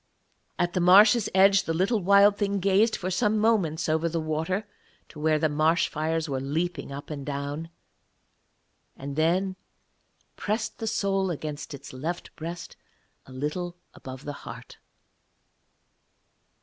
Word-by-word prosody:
At 175 0 0
the - - 0
marsh's 205 +5 +6
edge 195 +1 +5
the 165 - -1
little 195 +6 +1
Wild 200 +2 +5
Thing 200 -1 -1
gazed 200 +4 +3
for 185 0 -4
some 210 +4 +1
moments 195 -8 +1
over 160 +1 +1
the 165 0 -2
water 160 +6 -2 0.4
to 155 - -12
where 155 0 +2
the 155 +1 +2
marsh 155 +3 +2
fires 160 +1 -2
were 135 -2 -2
leaping 155 +3 -3
up 140 +3 -8
and 140 -2 -5
down, 145 +3 -4 1.3
and 140 +1 -6
then 180 +5 +1 0.8
pressed 220 +1 -3
the 225 - -3
soul 195 -3 0
against 150 -3 -5
its 140 0 -11
left 165 +7 -5
breast 170 +2 -7 0.5
a - - -13
little 160 +7 -4 0.2
above 130 +1 -10
the 145 - -4
heart. - - -10
170 Hz, 140 wpm, -26 LUFS, 150-195 Hz, 1.3 s, marsh's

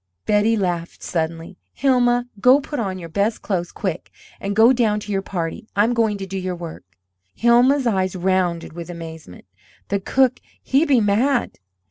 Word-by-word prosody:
Betty 215 +2 +3
laughed 175 -4 -3
suddenly. 165 +2 -4 0.2
"Hilma, 245 -2 +2
go 255 +6 +6
put 290 0 -5
on 190 -4 -2
your 170 -2 -8
best 200 +6 -1
clothes, 175 -4 -2
quick, 180 -4 -4 0.3
and 200 0 -3
go 225 +4 +6
down 220 -4 +1
to 210 - -7
your 195 -1 0
party. 175 +1 -5
I'm 215 +4 +3
going 225 -3 +1
to 195 - -5
do 190 0 -5
your 185 -1 -3
work." 170 -2 -8 0.5
Hilma's 250 +4 +4
eyes 190 -5 0
rounded 180 -3 0
with 170 +1 -8
amazement. 160 - -9 0.4
"The 200 - 0
cook, 255 +5 +2 0.2
he 275 +5 +2
be 270 -6 +4
mad." 230 +5 +1
200 Hz, 165 wpm, -21 LUFS, 175-240 Hz, 0.5 s, go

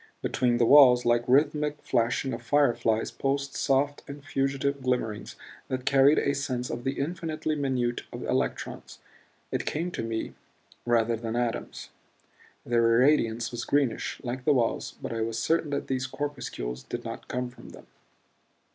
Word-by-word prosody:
Between 120 -2 +1
the 120 - +3
walls, 125 -2 +7
like 120 0 +3
rhythmic 150 +2 +2
flashing 120 +3 0
of 115 - -5
fire 140 +1 +3
flies, 110 -1 0
pulsed 140 0 -2
soft 140 +1 +1
and 140 0 -9
fugitive 135 +1 -1
glimmerings 125 -5 -2 0.3
that 130 0 -3
carried 140 +2 +5
a 140 - +2
sense 130 -3 -3
of 120 - -5
the 135 - 0
infinitely 155 +1 -3
minute 130 -4 -1
of - - -6
electrons, - - -3 0.5
it - - -2
came 170 +4 -2
to - - -4
me, 115 0 -3 0.5
rather 115 -1 +3
than 115 0 -4
atoms. 120 -1 -3 0.7
Their 115 -1 +3
irradiance 115 -5 +2
was 120 -1 -4
greenish, 140 -4 0
like 125 +1 -4
the 150 - +4
walls; 120 -4 0
but - - -3
I 115 - -2
was 115 0 -2
certain 160 +6 +1
that 140 - -2
these 130 -1 -2
corpuscles 130 - -5
did - - -6
not - - -7
come 125 0 -3
from 125 - -13
them. - - -13
130 Hz, 160 wpm, -27 LUFS, 120-140 Hz, 0.7 s, walls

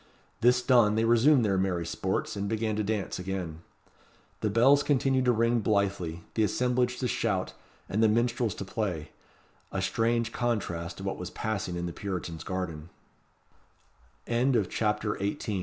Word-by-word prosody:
This 125 +1 +4
done, 120 -5 +4
they 110 +1 +2
resumed 120 +3 +5
their 95 -2 +2
merry 90 -3 0
sports, 95 +4 -2
and 100 0 -3
began 110 -1 -1
to 105 - 0
dance, 105 -3 -2
again. 90 -4 -4 0.8
The 105 - 0
bells 130 +7 +5
continued 135 -2 +2
to 125 - +5
ring 115 +1 +2
blithely, 100 -6 0
the 110 - 0
assemblage 125 +3 +1
to 125 - +1
shout, 100 -6 -1 0.3
and 105 - 0
the 110 - +5
minstrels 120 -1 +1
to 100 - -6
play. 90 -7 -3 0.6
A 95 - -2
strange 115 +4 0
contrast 100 -9 -2
to 95 - -8
what 95 - -3
was 90 0 -5
passing 100 -4 -3
in 85 0 -3
the 85 - -4
Puritan's 90 -5 -5
garden. 85 -4 -4 1.4
CHAPTER 110 -3 +1
XIX. 100 +1 -1
Theobalds' - - -9
Palace. 105 -4 -1
105 Hz, 160 wpm, -28 LUFS, 95-120 Hz, 1.4 s, resumed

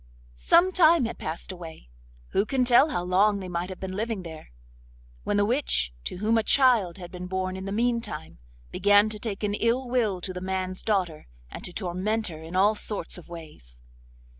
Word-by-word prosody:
Some 340 - +4
time 335 -6 +5
had 230 - -5
passed 160 +4 -5
away—who - - -6
can 260 -2 +1
tell 250 +5 +6
how 175 - -2
long 200 +3 +3
they 185 - -6
might 175 0 -3
have 185 - -8
been 190 -1 -5
living 220 -2 -3
there?—when - - -8
the 205 - +3
witch, 215 - +1
to - - -4
whom 220 +4 +2
a - - 0
child 230 -10 +4
had 175 -2 -9
been 180 0 -7
born 185 0 -2
in 190 0 -6
the 195 - -4
meantime, 230 - -2 0.3
began 205 +2 +4
to 215 -1 -6
take 210 -2 -5
an 205 -1 0
ill 235 +4 0
will 230 -7 0
to 185 - -4
the 180 - -6
man's 185 0 -3
daughter, 185 -8 -1 0.2
and - - -8
to 180 - -4
torment 200 +4 -2
her 160 -2 -9
in 165 +3 -8
all 200 +3 +4
sorts 210 -4 -3
of 175 - -16
ways. 150 - -11
190 Hz, 190 wpm, -26 LUFS, 170-220 Hz, 0.3 s, tell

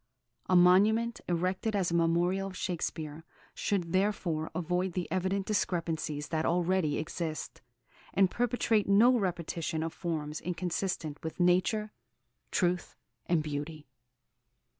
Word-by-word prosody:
A 185 - +4
monument, 210 +6 +5
erected 185 +5 0
as 185 -4 +1
a - - -1
memorial 170 +3 +2
of 185 -1 -8
Shakespeare, 160 -3 -3 0.3
should 180 -4 -1
therefore 185 -5 0
avoid 180 +1 -1
the 180 -1 -2
evident 190 +1 0
discrepancies 165 -7 -1
that 160 -1 0
already 175 -2 +1
exist, 160 0 -4 0.5
and 190 0 +3
perpetrate 235 -3 +1
no 230 +6 +6
repetition 170 -5 -2
of 165 - -3
forms 155 -3 -3
inconsistent 175 -3 -3
with 160 +2 -5
nature, 185 +5 +2 0.6
truth, 180 -1 0 0.3
and 170 -3 +2
beauty." 150 +1 -5
180 Hz, 120 wpm, -30 LUFS, 160-195 Hz, 0.6 s, no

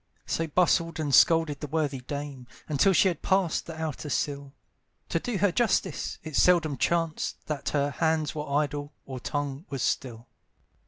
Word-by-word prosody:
So 165 - -1
bustled 165 0 +2
and 145 -3 -1
scolded 160 -3 +5
the 150 - -5
worthy 145 -2 -1
dame, 140 -1 -6 0.2
Until 155 +6 +3
she 190 +2 +5
had 175 - -1
passed 190 -4 +1
the 160 -1 -7
outer 155 -1 -4
sill, 140 0 -2 0.6
To - - +1
do 245 -5 -3
her 200 0 +3
justice, 235 +4 0
it 155 -2 -6
seldom 165 -4 +4
chanced 165 +3 -1
That 150 -2 -3
her 145 -1 0
hands 160 +1 0
were 150 -1 -5
idle, 145 0 -1
or 130 -2 -6
tongue 145 +3 -3
was 135 -3 -3
still. 120 -3 -2
150 Hz, 165 wpm, -27 LUFS, 140-165 Hz, 0.6 s, scolded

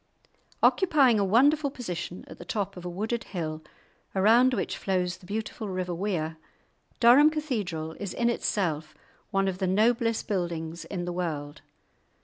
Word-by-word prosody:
Occupying 285 - +4
a - - +3
wonderful 280 +9 +4
position 180 - -6
at - - -12
the - - -7
top 200 -2 -3
of 180 - -9
a - - -3
wooded 220 +6 -2
hill, 160 -4 -4 0.5
around 230 +7 +5
which - - -2
flows 185 -2 -1
the 180 - -17
beautiful 215 +1 -4
river 185 -1 -2
Wear, 165 -4 -2 0.6
Durham 255 +6 +7
Cathedral 210 - -3
is 200 -3 -4
in 235 - +1
itself 160 -10 -1 0.3
one 195 -1 +1
of 185 -1 -2
the 190 - 0
noblest 230 +4 +2
buildings 170 -4 -3
in 180 -3 -4
the 175 - -3
world. 150 -5 -4
195 Hz, 150 wpm, -27 LUFS, 175-235 Hz, 0.6 s, Durham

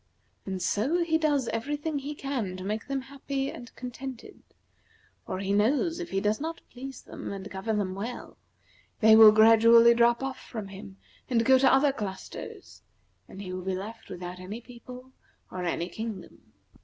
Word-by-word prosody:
And 190 -2 -3
so 270 - +1
he 320 -1 +1
does 290 -5 +1
every 275 +6 -2
thing 300 0 -3
that - - -4
he 290 +2 -5
can 245 -11 -3
to 185 - -7
make 210 +3 -3
them 275 -1 -2
happy 275 0 -4
and 240 - -10
contented, 255 0 -8 0.9
for - - -3
he 195 +1 -1
knows 275 - +2
if 350 - -5
he 195 - 0
does 210 +5 0
not 330 +2 -4
please 265 +2 -9
them - - -7
and 195 0 -6
govern 210 +3 -2
them 190 -3 -1
well, 225 +6 -6 0.6
they 220 0 +7
will 220 -1 +10
gradually 230 +2 +7
drop 235 +2 +3
off 270 -1 -4
from 215 -4 -7
him 195 0 -10 0.3
and 230 -2 +2
go 260 +1 +6
to 265 0 +5
other 275 +1 +4
clusters, 205 -7 -8 0.5
and 195 - -9
he 185 -1 -6
will 185 - -4
be 190 +1 -2
left 215 +4 -8
without 180 0 -7
any 195 +5 -7
people 250 +2 -12 0.4
or 180 -1 -4
any 170 0 -1
kingdom." 220 +1 -8
230 Hz, 180 wpm, -28 LUFS, 195-270 Hz, 0.9 s, will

